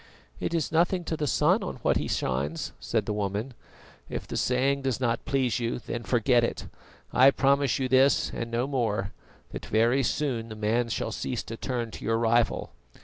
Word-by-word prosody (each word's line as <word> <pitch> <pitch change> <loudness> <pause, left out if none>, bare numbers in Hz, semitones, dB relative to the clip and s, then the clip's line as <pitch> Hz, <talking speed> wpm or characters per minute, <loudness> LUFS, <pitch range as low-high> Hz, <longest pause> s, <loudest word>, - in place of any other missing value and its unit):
"It 170 - -2
is 160 -2 -1
nothing 175 +3 +2
to 165 - -2
the 150 -1 -2
sun 175 - +3
on 190 - -4
what - - +3
he - - -2
shines," 70 +5 -2
said - - -1
the 105 - -2
woman. 105 +5 -2 0.6
"If - - -4
the - - -5
saying 135 +2 +1
does 130 -4 -1
not 120 -3 -1
please 130 -4 +1
you, 115 -1 -1
then 120 -1 -5
forget 120 0 +2
it. 115 - -2 0.5
I 130 +2 +7
promise 140 -1 +2
you 130 - -1
this 130 +2 +4
and 115 - -4
no 120 +2 0
more, 115 -7 -1 0.4
that - - -7
very 115 +5 +3
soon 125 -4 -1
the 110 - -7
man 110 +3 0
shall 115 - -2
cease 120 +2 -3
to 115 - -7
turn 120 -1 -3
to - - -9
your 115 0 +1
rival." 115 0 +1
120 Hz, 195 wpm, -27 LUFS, 115-135 Hz, 0.6 s, I